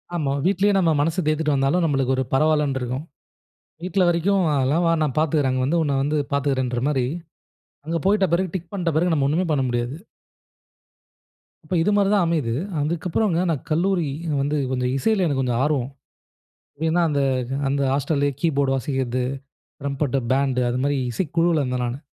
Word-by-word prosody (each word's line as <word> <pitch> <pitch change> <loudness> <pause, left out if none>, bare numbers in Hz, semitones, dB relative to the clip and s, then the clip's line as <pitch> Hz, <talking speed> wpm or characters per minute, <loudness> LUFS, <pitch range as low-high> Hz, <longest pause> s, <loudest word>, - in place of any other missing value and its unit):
ஆமா, 145 -5 -1
வீட்டிலயே 200 +2 +2
நம்ம 170 -4 +3
மனசை 165 +5 +1
தேத்திட்டு 155 -1 +1
வந்தாலும், 140 +6 +1
நம்மளுக்கு 135 -4 +1
ஒரு 130 - 0
பரவாயில்லன்னு 150 -2 +2
இருக்கும். 125 +4 -3 0.8
"வீட்டில 180 0 +1
வரைக்கும் 185 +3 +2
அதெல்லாம் 140 +6 +1
வா 165 - +3
நான் 145 -4 -1
பார்த்துக்கிறேன். 150 -4 +1
அங்க 130 0 0
வந்து 165 +5 +1
உன்னை 140 -3 0
வந்து 150 +2 0 0.2
பார்த்துக்கிறேன்ற" 130 -3 0
மாரி, 130 -4 +1 0.8
அங்க 165 +2 -1
போயிட்ட 195 0 +3
பிறகு 185 0 0
டிக் 170 -2 -5
பண்ணிட்ட 175 -5 -1
பிறகு 175 +1 +2
நம்ம 140 -3 +2
ஒன்னுமே 175 +5 +1
பண்ண 140 -3 +1
முடியாது. 120 +3 -2 1.7
இப்ப, 155 - -6
இது 205 - +2
மாரி 200 -1 +3
தான் 200 -4 +3
அமையுது. 155 -9 0 0.3
அதுக்கப்றங்க, 170 +4 0
நான் 150 -5 -2
கல்லூரி 175 0 +1 0.3
வந்து 145 +2 0
கொஞ்ச 125 -1 -1
இசைல 210 +5 +1
எனக்கு 140 -3 0
கொஞ்ச 125 -2 0
ஆர்வம். 140 -4 0 1.0
ஏனா 175 +2 +2
அந்த, 145 -1 0 0.5
அந்த 140 0 0
ஹாஸ்டல்லயே 145 0 0
கீபோர்டு 140 -4 +1
வாசிக்கிறது. 130 -2 -2 0.6
ரம்பட்ட 140 -1 -1
பேண்டு 135 -2 +1
அது 125 - -1
மாரி 145 -1 +1
இசைக்குழுவுல 165 +1 +1
இருந்தேன் 125 -1 -2
நானு. 120 +3 -4
150 Hz, 160 wpm, -22 LUFS, 135-170 Hz, 1.7 s, நம்ம